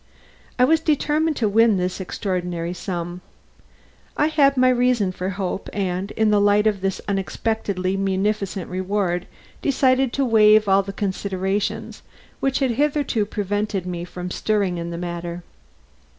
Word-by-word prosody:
I 250 - +4
was 320 +4 +4
determined 310 0 +1
to 225 - +1
win 220 0 +4
this 180 +1 -2
extraordinary 180 -3 -3
sum. 175 -1 -5 1.0
I 300 - +3
had 280 -3 +3
my 255 0 +5
reason 245 -5 +2
for 185 +1 -4
hope 195 0 -4
and, 190 -1 -2
in 220 -1 +2
the 205 -1 +4
light 205 +1 +4
of 205 -3 +1
this 195 -1 -1
unexpectedly 195 0 -1
munificent 195 -1 -1
reward, 185 -1 -1 0.3
decided 265 -2 +2
to 275 - +1
waive 215 -2 +5
all 195 0 +5
the 195 0 -6
considerations 195 0 -2 0.4
which 270 0 0
had 265 -3 +1
hitherto 280 -5 0
prevented 205 -2 -2
me 175 -1 -4
from 180 0 -7
stirring 200 -5 0
in 170 0 -4
the 170 - -5
matter. 175 0 -5
200 Hz, 145 wpm, -22 LUFS, 185-230 Hz, 1.0 s, my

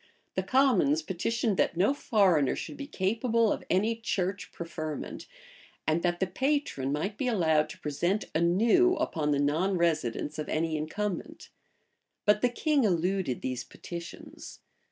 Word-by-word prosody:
The - - 0
commons 210 - +3
petitioned, 210 +5 -1
that - - +1
no 200 +10 +3
foreigner 190 - +2
should - - -6
be 280 - -7
capable 225 0 +1
of - - -6
any 210 +5 +2
church 200 -4 -2
preferment, 155 -3 -6 0.6
and 155 +2 +1
that 175 0 0
the 190 - +2
patron 260 - -1
might 195 +8 -2
be 265 - 0
allowed 160 -9 +2
to - - -10
present 175 +8 -1
anew 220 - +4
upon 150 - -1
the 145 - +2
non 160 +7 +1
residence 155 -4 0
of 155 - -4
any 160 0 0
incumbent:[*] 205 - -4 0.8
but 210 0 +4
the 250 - +3
king 290 +3 +1
eluded 180 - 0
these 130 -1 -2
petitions. 170 -1 -9
185 Hz, 145 wpm, -29 LUFS, 155-225 Hz, 0.8 s, anew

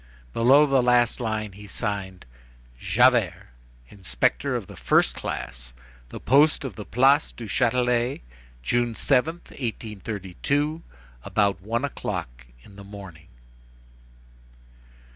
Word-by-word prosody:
Below 135 +6 +5
the 135 -2 +3
last 120 -1 +3
line 110 -3 -2
he 105 +2 -12
signed: 95 -3 -4 0.5
"JAVERT, 115 - +3 0.5
"Inspector 85 -12 -1
of - - -3
the - - -12
1st - - +2
class. 60 -1 -6 0.4
"The - - -8
Post 145 +3 +3
of 120 -8 -6
the 105 - -8
Place 135 +6 +3
du 120 - -9
Châtelet. 125 +2 +1 0.4
"June 120 - 0
7th, 150 +8 0
1832, 115 - -3 0.4
about 100 -2 0
one 115 +7 -1
o'clock - - -5 0.2
in 100 - -16
the 100 - -10
morning." 100 -5 -11
115 Hz, 110 wpm, -25 LUFS, 100-125 Hz, 0.5 s, Below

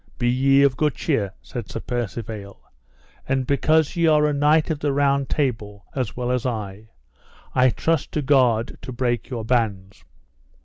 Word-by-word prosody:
Be 120 - 0
ye 135 +3 +4
of 135 -2 +2
good 150 -2 +1
cheer, 105 - -1
said 115 -7 -7
Sir - - -5
Percivale, 110 -4 -5 0.7
and 135 -1 +1
because 155 +4 +2
ye 170 -1 +2
are 150 -1 +4
a 150 - +1
knight 150 +3 +3
of 155 - -2
the 145 -1 0
Round 140 -1 +1
Table 110 -8 -2
as 125 -6 -3
well 125 0 -1
as 125 -1 0
I, 110 -3 -5 0.6
I 130 0 +4
trust 160 +4 -1
to 150 - -1
God 125 -5 +2
to - - -7
break 120 -2 -2
your 115 -4 -4
bands. 105 -5 -1
125 Hz, 170 wpm, -22 LUFS, 110-140 Hz, 0.7 s, ye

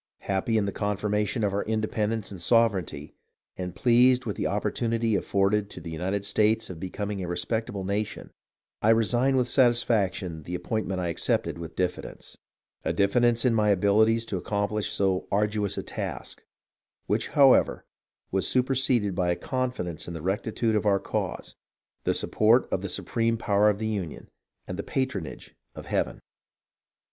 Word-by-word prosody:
Happy 100 +3 0
in 105 - +1
the 100 - -2
confirmation 105 +2 -1
of 100 -2 +1
our 100 - 0
independence 110 0 -1
and 95 - -8
sover 115 +1 +3
eignty, 75 -2 -10 0.4
and 90 -1 -5
pleased 125 +3 +4
with 105 -4 -3
the - - -1
opportunity 115 -2 0
afforded 100 +1 +1
to - - -9
the 85 - -8
United 95 +5 -2
States 110 0 +2
of 85 - -9
becoming 100 +2 -4
a 90 - -4
respectable 95 +4 -2
nation, 100 +2 -3 0.5
I 110 - +3
resign 120 +4 +3
with 125 -1 +2
satisfaction 110 - +1
the 90 +4 -5
appointment 95 0 -2
I 90 -1 -1
accepted 85 - -1
with 85 -1 -8
diffi 90 -1 -1
dence; - - -10 0.5
a - - 0
diffidence 115 +4 +2
in 125 - +4
my 105 -2 +2
abilities 110 +4 +3
to 100 - -3
accomplish 105 +2 -1
so 95 -2 0
arduous 105 -1 0
a - - -2
task, - - -6 0.6
which, - - 0
however, 135 -2 +5 0.5
was 95 -1 0
superseded 125 -5 +1
by 90 -1 0
a 85 - +2
confidence 125 - -3
in 85 - -6
the 80 - -7
rectitude 110 +4 -1
of 105 0 +1
our 100 -1 +4
cause, - - -4 0.5
the - - +2
support 115 +3 +3
of - - 0
the - - -4
supreme 115 0 0
power 105 -1 +3
of 105 - 0
the 110 - -4
Union, 100 -8 -4 0.4
and 90 - -6
the - - -2
patronage 130 - -4 0.2
of - - -8
Heaven. - - -2
105 Hz, 165 wpm, -27 LUFS, 95-115 Hz, 0.6 s, however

